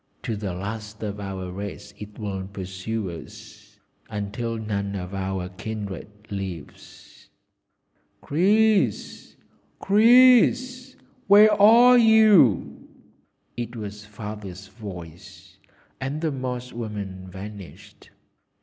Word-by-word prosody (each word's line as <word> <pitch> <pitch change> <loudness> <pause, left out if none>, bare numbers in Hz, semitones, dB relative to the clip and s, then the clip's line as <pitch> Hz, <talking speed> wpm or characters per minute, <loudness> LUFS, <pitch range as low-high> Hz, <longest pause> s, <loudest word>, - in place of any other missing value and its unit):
To 115 - -3
the 100 -4 -4
last 105 +3 -7
of 105 -1 -4
our 95 -2 -6
race 100 +2 -8
it 105 0 -11
will 95 -3 -5
pursue 95 +1 -5
us, 85 - -13 0.3
until 105 +3 -4
none 100 -2 -3
of 90 0 -6
our 95 -1 -3
kindred 100 +1 -7 0.2
lives." 95 -6 -9 0.9
"Chris! 195 - +1 0.4
Chris! 250 +4 +4 0.3
where 210 +2 +7
are 240 +4 +7
you?" 215 - +4 0.7
It 120 0 -5
was 105 -1 -7
Father's 105 -3 -8
voice, 90 -6 -11 0.4
and 135 +3 -3
the 160 -2 0
Moss 125 -2 -5
woman 100 -5 -6
vanished. 100 0 -11
105 Hz, 95 wpm, -24 LUFS, 95-145 Hz, 0.9 s, where